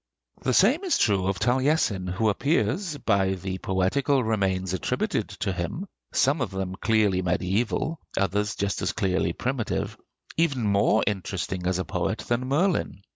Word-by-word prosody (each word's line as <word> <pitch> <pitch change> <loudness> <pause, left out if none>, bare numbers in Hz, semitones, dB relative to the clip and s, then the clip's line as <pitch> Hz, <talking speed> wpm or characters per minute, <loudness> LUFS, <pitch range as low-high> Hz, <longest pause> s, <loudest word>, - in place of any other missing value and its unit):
The 130 -1 +1
same 265 - +4
is 370 - +2
true 100 -4 +2
of 95 -1 0
Taliesin, 125 - +1
who 105 +4 +1
appears, 145 - 0
by 95 -6 +1
the 95 0 -5
poetical 130 +9 +1
remains 95 -4 0
attributed 95 - -1
to 95 - 0
him, 90 - -3 0.3
some 140 +2 +2
of 125 - 0
them 95 -1 -4
clearly 105 -3 +2
mediæval, 100 - 0 0.2
others 105 +2 0
just 100 0 -1
as - - 0
clearly 95 -3 0
primitive, 130 -3 -2 0.4
even 145 -7 +1
more 100 +1 +3
interesting 95 -3 -2
as 90 0 +1
a 95 - -2
poet - - -1
than 120 +2 0
Merlin. 155 - 0
105 Hz, 150 wpm, -26 LUFS, 95-130 Hz, 0.4 s, same